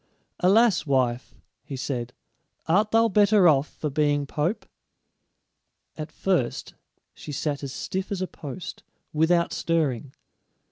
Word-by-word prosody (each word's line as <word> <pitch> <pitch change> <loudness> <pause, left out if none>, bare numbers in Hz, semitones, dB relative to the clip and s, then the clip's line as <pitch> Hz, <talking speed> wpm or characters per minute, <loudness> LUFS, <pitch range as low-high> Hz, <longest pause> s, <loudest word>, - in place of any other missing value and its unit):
"Alas, 200 0 +4
wife," 125 -2 0 0.3
he 140 - -7
said, 125 -2 -3 0.5
"art 205 +6 +3
thou 225 +1 +4
better 205 -2 +5
off 145 -2 +4
for 150 - -5
being 145 0 +1
pope?" 155 +9 -2 1.3
At 155 -1 -6
first 170 -9 -1 0.4
she 150 - -9
sat 145 0 -2
as 140 -2 -5
stiff 190 +8 -4
as 200 - -2
a - - 0
post, 155 -1 -8 0.3
without 170 +2 +2
stirring. 145 -6 -1
155 Hz, 125 wpm, -25 LUFS, 140-185 Hz, 1.3 s, better